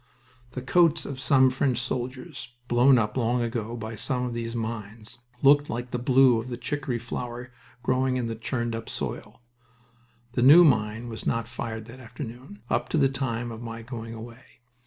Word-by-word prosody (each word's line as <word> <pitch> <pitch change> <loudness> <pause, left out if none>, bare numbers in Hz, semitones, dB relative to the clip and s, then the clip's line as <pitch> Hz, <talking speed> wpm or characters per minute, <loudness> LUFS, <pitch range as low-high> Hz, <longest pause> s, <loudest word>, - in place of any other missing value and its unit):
The 125 - -5
coats 170 +3 +3
of 135 -2 -6
some 130 0 +4
French 130 -1 +1
soldiers, 125 0 -4
blown 125 +2 +5
up 110 -2 0
long 120 -1 +1
ago 115 0 -3
by 110 0 -6
some 125 +4 -1
of 125 -1 -3
these 115 0 -4
mines, 110 0 -6 0.2
looked 145 +1 +6
like 120 +1 -4
the 125 - -2
blue 125 -1 +5
of 120 - -9
the 120 -1 -5
chicory 135 -2 -2
flower 120 +1 -6 0.3
growing 130 +1 +1
in 125 - -1
the 115 - -2
churned 115 +1 -3
up 115 0 -5
soil... - - -6 0.9
The 125 - -1
new 150 +8 +9
mine 110 -3 +1
was 115 -1 -6
not 115 -1 0
fired 110 -2 -5
that 120 +3 -12
afternoon, 120 -2 -9
up - - -1
to - - 0
the 135 -3 +4
time 120 -3 -3
of 115 0 -8
my 115 -1 -7
going 115 -1 -7
away. 115 +2 -12
120 Hz, 180 wpm, -26 LUFS, 115-130 Hz, 0.9 s, new